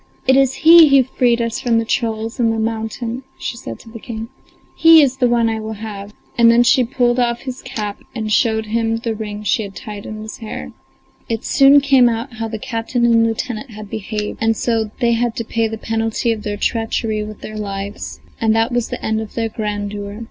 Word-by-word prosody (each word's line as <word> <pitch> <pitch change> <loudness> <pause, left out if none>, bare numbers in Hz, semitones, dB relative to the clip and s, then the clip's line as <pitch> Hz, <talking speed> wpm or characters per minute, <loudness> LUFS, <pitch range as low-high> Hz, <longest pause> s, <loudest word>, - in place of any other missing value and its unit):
It 265 - +4
is 270 -1 +3
he 330 0 +10
who 275 -1 +6
freed 240 -2 +1
us 230 -1 -2
from 235 -2 +1
the 230 - 0
trolls 225 +1 -2
in 235 -2 +3
the 225 - 0
mountain," 225 +2 -3 0.2
she - - -4
said 115 - -7
to - - -15
the 230 - -9
King. 225 0 -7 0.5
"He 330 0 +7
is 265 -1 0
the 250 -2 +3
one 235 -1 +2
I 225 -1 -1
will 220 0 -5
have!" 205 -1 -7 0.3
and 230 0 +7
then 235 +1 +5
she 250 +1 +4
pulled 245 0 +1
off 240 -1 0
his 255 -1 -6
cap 215 -6 -5 0.2
and 220 -2 -3
showed 220 0 +2
them 225 +1 0
the 230 0 -3
ring 210 -1 -6
she 210 +2 +1
had 200 -2 -7
tied 210 -2 -8
in 215 - -7
his 220 - -8
hair. 75 - -7 0.6
It 225 -1 -3
soon 275 +1 +6
came 270 -3 +5
out 235 +3 -4
how 225 0 -3
the 220 0 -5
captain 230 +2 -2
and 230 -1 +4
lieutenant 230 +2 -2
had 215 -2 -10
behaved, 215 -1 -4
and 225 -1 +2
so 225 -2 0
they 235 -1 +3
had 235 0 0
to 230 - -3
pay 230 0 0
the 220 0 -5
penalty 225 +1 -1
of 220 -2 -3
their 205 0 -4
treachery 225 -1 -1
with 215 0 -9
their 215 - -8
lives, 200 0 -6 0.2
and 220 -1 +3
that 225 +2 +2
was 240 -1 -1
the - - -5
end 220 0 0
of 220 - -9
their 225 -1 -1
grandeur. 205 -1 -4
225 Hz, 220 wpm, -18 LUFS, 215-240 Hz, 0.6 s, he